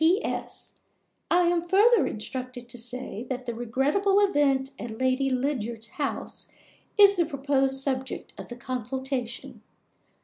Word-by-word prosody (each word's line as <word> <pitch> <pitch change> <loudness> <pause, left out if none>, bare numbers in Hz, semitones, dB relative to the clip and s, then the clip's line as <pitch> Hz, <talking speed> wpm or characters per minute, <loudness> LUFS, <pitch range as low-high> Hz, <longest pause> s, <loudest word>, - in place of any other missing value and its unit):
P.S. 365 +7 0 0.6
I 355 - +5
am 345 -1 +3
further 405 +6 +5
instructed 250 +3 -5
to 245 - -9
say 245 -1 -5
that 255 -1 -3
the 235 - -3
regrettable 275 - +2
event 285 -9 +2
at 225 -2 -6
Lady 260 +2 +1
Lydiard's 240 -4 -2
house 285 -2 -4 0.5
is 405 -1 +8
the 340 - +3
proposed 270 -2 +1
subject 265 -1 -3
of - - -9
the 240 - -8
consultation. 255 0 -4
265 Hz, 130 wpm, -27 LUFS, 245-305 Hz, 0.6 s, is